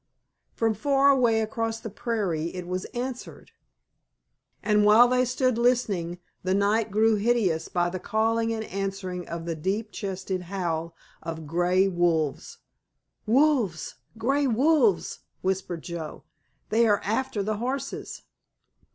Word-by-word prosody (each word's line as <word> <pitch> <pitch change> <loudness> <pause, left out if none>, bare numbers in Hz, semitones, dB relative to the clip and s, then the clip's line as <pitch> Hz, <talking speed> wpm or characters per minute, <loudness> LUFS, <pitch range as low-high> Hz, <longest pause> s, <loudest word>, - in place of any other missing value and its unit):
From 225 -1 +1
far 275 +5 +3
away 235 -5 +3
across 225 +1 -2
the 225 - -7
prairie 190 -8 -2
it 180 -1 -5
was 185 +1 -3
answered, 250 +1 -6 1.1
and 210 -1 +3
while 215 +4 +7
they 250 +1 +2
stood 255 -1 0
listening 210 -9 +1 0.2
the 185 +1 0
night 210 +3 +2
grew 215 +2 +3
hideous 200 -7 +1
by 175 -1 0
the 185 +1 -4
calling 225 +3 0
and 220 -1 -2
answering 195 -2 -4
of 165 0 -5
the 170 - -2
deep 195 +7 -2
chested 190 -2 -4
howl 170 -4 -3 0.3
of 160 -1 -6
grey 175 +4 +2
wolves. 170 -5 0 0.7
"Wolves—grey 255 - +1
wolves!" 305 - +2 0.2
whispered 185 -3 -2
Joe, 170 -3 -6 0.5
"they 230 +2 +3
are 205 -2 +3
after 220 0 -1
the 215 +1 -2
horses!" 255 +5 -4
210 Hz, 125 wpm, -26 LUFS, 180-235 Hz, 1.1 s, while